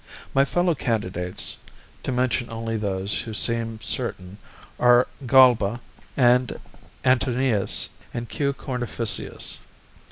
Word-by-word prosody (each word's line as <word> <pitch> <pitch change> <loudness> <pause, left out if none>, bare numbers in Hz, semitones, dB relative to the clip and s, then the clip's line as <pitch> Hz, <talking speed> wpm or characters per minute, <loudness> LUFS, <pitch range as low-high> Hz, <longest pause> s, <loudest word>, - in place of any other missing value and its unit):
My 135 +1 +4
fellow 175 +4 +1
candidates, 95 - -2 0.4
to - - -3
mention 125 -1 0
only 115 0 -3
those 100 -2 -1
who 110 -2 -6
seem 115 -1 -1
certain, 90 0 -3 0.4
are 120 0 +5 0.2
Galba 120 -4 +5 0.4
and 125 -1 +3 0.5
Antonius 125 -4 +2 0.2
and 120 0 -5
Q. 140 +3 -1
Cornificius. 120 -4 -3
120 Hz, 100 wpm, -24 LUFS, 110-125 Hz, 0.5 s, are